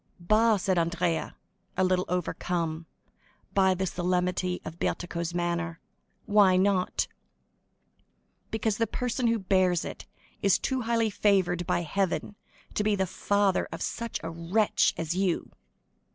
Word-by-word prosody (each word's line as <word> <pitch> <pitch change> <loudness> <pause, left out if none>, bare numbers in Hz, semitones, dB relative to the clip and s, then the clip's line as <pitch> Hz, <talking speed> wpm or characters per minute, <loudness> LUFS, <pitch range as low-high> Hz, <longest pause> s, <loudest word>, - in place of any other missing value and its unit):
"Bah," 215 +5 +4
said 185 -2 +1
Andrea, 170 0 -1 0.4
a 190 - +3
little 185 0 +2
overcome, 170 -2 -2 0.7
by 190 -1 +4
the 190 +1 -1
solemnity 180 0 0
of 160 +2 -8
Bertuccio's 170 -1 -2
manner, 170 -1 -1 0.5
"why 200 -3 +5
not?" 190 -1 +1 1.4
"Because 220 -1 -1
the 230 - +2
person 250 0 -1
who 230 0 +2
bears 185 -3 +2
it - - -8 0.3
is 200 -2 +4
too 260 -1 -1
highly 230 -1 +1
favored 185 -4 +2
by 175 - +1
Heaven 195 +4 -1 0.4
to 210 - 0
be 210 0 +2
the 190 -1 +1
father 195 +1 +1
of - - -4
such 235 -1 -3
a 165 - -4
wretch 170 +6 +1
as 165 0 -2
you." 185 -1 0
185 Hz, 135 wpm, -28 LUFS, 175-205 Hz, 1.4 s, why